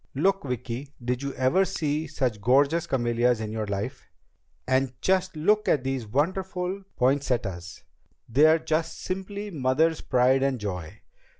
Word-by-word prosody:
"Look, 195 Hz, +4 st, +1 dB
Vicki. 125 Hz, +2 st, -5 dB
Did 125 Hz, +1 st, -1 dB
you 140 Hz, 0 st, -3 dB
ever 130 Hz, +9 st, +3 dB
see 155 Hz, -3 st, -2 dB
such 130 Hz, -8 st, -2 dB
gorgeous 140 Hz, +8 st, +3 dB
camellias 120 Hz, -2 st, +1 dB
in 110 Hz, -1 st, -4 dB
your 110 Hz, -1 st, -3 dB
life? 100 Hz, +7 st, -4 dB, 0.6 s
And 130 Hz, -1 st, 0 dB
just 185 Hz, -1 st, +1 dB
look 205 Hz, +7 st, +2 dB
at 140 Hz, -, +2 dB
these 130 Hz, -4 st, -2 dB
wonderful 185 Hz, -, -1 dB
poinsettias. 120 Hz, -10 st, -1 dB, 0.4 s
They're 155 Hz, +7 st, +5 dB
just 160 Hz, 0 st, -2 dB
simply 200 Hz, +2 st, -5 dB
Mother's 155 Hz, +2 st, +1 dB
pride 130 Hz, +1 st, +3 dB
and 135 Hz, -2 st, +1 dB
joy! 90 Hz, -6 st, -6 dB
135 Hz, 135 wpm, -26 LUFS, 125-165 Hz, 0.6 s, They're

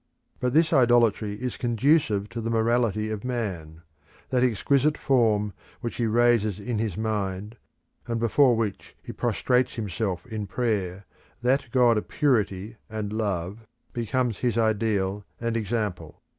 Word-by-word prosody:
But 125 Hz, 0 st, 0 dB
this 165 Hz, +1 st, +4 dB
idolatry 120 Hz, -5 st, +3 dB
is 125 Hz, +3 st, -4 dB
conducive 120 Hz, -3 st, +2 dB
to 115 Hz, -, -5 dB
the 115 Hz, -, -3 dB
morality 115 Hz, -2 st, +1 dB
of 105 Hz, -2 st, -4 dB
man. 90 Hz, -11 st, -4 dB, 0.5 s
That 125 Hz, -1 st, +2 dB
exquisite 140 Hz, +5 st, +2 dB
form 110 Hz, -6 st, +2 dB, 0.3 s
which 120 Hz, -2 st, -4 dB
he 115 Hz, -, +1 dB
raises 115 Hz, -3 st, +3 dB
in 110 Hz, +1 st, -3 dB
his 105 Hz, -5 st, -2 dB
mind, 105 Hz, -1 st, -2 dB, 0.5 s
and 115 Hz, -1 st, -1 dB
before 120 Hz, +2 st, +4 dB
which 110 Hz, -3 st, -3 dB
he -, -, -7 dB
prostrates 125 Hz, 0 st, +1 dB
him 110 Hz, -4 st, -4 dB
self 95 Hz, +1 st, -2 dB
in 110 Hz, -4 st, -5 dB
prayer, 100 Hz, -4 st, -2 dB, 0.4 s
that 130 Hz, +2 st, +2 dB
God 120 Hz, -3 st, +4 dB
of -, -, -10 dB
purity 110 Hz, -6 st, 0 dB
and 110 Hz, -1 st, -4 dB
love, 105 Hz, 0 st, -3 dB, 0.3 s
becomes 120 Hz, -1 st, -1 dB
his 120 Hz, -3 st, 0 dB
ideal 105 Hz, -3 st, +1 dB, 0.2 s
and 115 Hz, -1 st, -2 dB
example. 105 Hz, -7 st, -3 dB
110 Hz, 145 wpm, -26 LUFS, 105-120 Hz, 0.5 s, this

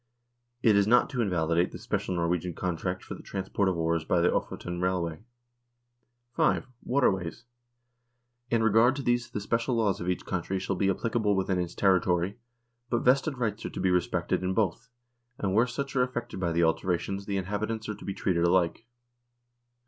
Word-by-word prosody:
It 110 Hz, -3 st, +5 dB
is 100 Hz, 0 st, +4 dB
not 125 Hz, +4 st, +4 dB
to 125 Hz, -4 st, -1 dB
invalidate 85 Hz, -4 st, +1 dB
the -, -, -7 dB
special 90 Hz, -, -2 dB
Norwegian 85 Hz, 0 st, -1 dB
contract 90 Hz, +1 st, -3 dB
for -, -, -7 dB
the -, -, -9 dB
transport 95 Hz, 0 st, -1 dB
of 90 Hz, -, -1 dB
ores 80 Hz, 0 st, 0 dB
by 85 Hz, -, +1 dB
the 85 Hz, -, +3 dB
Ofoten 90 Hz, 0 st, -3 dB
railway. 90 Hz, -3 st, -1 dB, 1.1 s
5. -, -, +2 dB, 0.2 s
Waterways. 95 Hz, -9 st, 0 dB, 1.1 s
In 115 Hz, -1 st, +2 dB
regard 115 Hz, +4 st, +5 dB
to 140 Hz, -, -4 dB
these 120 Hz, -1 st, +1 dB
the 105 Hz, -, -4 dB
special 115 Hz, +4 st, 0 dB
laws 105 Hz, -5 st, +1 dB
of 90 Hz, -, -2 dB
each 90 Hz, -, -2 dB
country 95 Hz, +1 st, -2 dB
shall 95 Hz, +1 st, -2 dB
be 95 Hz, +2 st, +1 dB
applicable 110 Hz, +1 st, +1 dB
within 95 Hz, -1 st, 0 dB
its 90 Hz, -1 st, -3 dB
territory, 95 Hz, 0 st, +2 dB, 0.5 s
but 120 Hz, -, 0 dB
vested 135 Hz, +2 st, +3 dB
rights 110 Hz, -3 st, -2 dB
are -, -, -3 dB
to -, -, -7 dB
be 95 Hz, 0 st, +2 dB
respected 90 Hz, 0 st, 0 dB
in 95 Hz, 0 st, -1 dB
both, 110 Hz, +3 st, 0 dB, 0.5 s
and 95 Hz, -2 st, -1 dB
where 115 Hz, +4 st, +4 dB
such 135 Hz, +3 st, -4 dB
are 130 Hz, -, +4 dB
affected 120 Hz, -4 st, -3 dB
by 85 Hz, -2 st, 0 dB
the 85 Hz, +1 st, +2 dB
alterations 90 Hz, +4 st, 0 dB
the 100 Hz, -1 st, -1 dB
inhabitants 105 Hz, +4 st, -3 dB
are 105 Hz, -, -2 dB
to -, -, -12 dB
be 100 Hz, -, -4 dB
treated 85 Hz, -3 st, 0 dB
alike. 90 Hz, +5 st, +2 dB
95 Hz, 180 wpm, -28 LUFS, 90-115 Hz, 1.1 s, It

